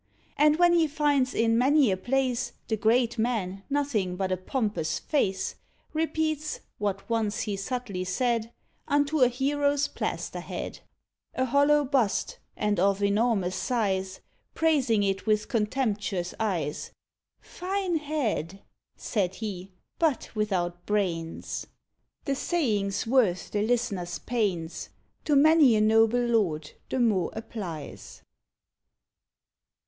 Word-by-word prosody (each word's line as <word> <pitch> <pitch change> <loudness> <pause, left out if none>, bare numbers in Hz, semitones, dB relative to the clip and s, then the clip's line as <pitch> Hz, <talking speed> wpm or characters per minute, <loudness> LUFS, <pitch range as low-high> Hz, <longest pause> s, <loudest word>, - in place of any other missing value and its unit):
And 300 0 +5
when 350 0 +5
he 335 -2 +4
finds 285 -3 +1
in 225 0 +3
many 270 -2 +4
a - - +2
place 255 +4 -1
The 220 - 0
great 230 +2 +2
man 205 -5 -1
nothing 270 -11 0
but 190 0 -2
a - - +3
pompous 185 - -2
face, 195 -11 -1 0.4
Repeats, 310 -1 -1 0.2
what 200 -2 -2
once 225 -3 0
he 210 -2 -2
subtly 200 -2 -3
said 230 +4 0 0.4
Unto 290 +1 +2
a 255 - +7
hero's 285 +3 +1
plaster - - -4
head - - -6 0.6
A 260 - +1
hollow 285 +3 +4
bust, 265 - 0 0.2
and 210 -3 0
of 195 +2 +2
enormous 200 -3 +1
size 190 -5 -1 0.3
Praising 270 -10 +2
it 195 +1 -1
with 215 0 +2
contemptuous 210 -6 -1
eyes, 170 -9 -2 0.5
"Fine 370 -1 -2
head," 235 - -2 0.3
said 190 -4 -1
he, 195 -4 -5 0.3
"but 315 -7 +1
without 175 -5 -1
brains." 175 -6 -2 0.6
The 275 - 0
saving's 220 - 0
worth 225 -7 +2
the 205 - 0
listener's 210 -6 -1
pains; 190 -9 -2 0.4
To 300 - +2
many 295 -4 +6
a 215 - +3
noble 225 +3 +4
lord 175 -11 0 0.2
the 260 - -1
mot 210 -8 +2
applies. 190 -9 -7
225 Hz, 120 wpm, -27 LUFS, 195-275 Hz, 0.6 s, a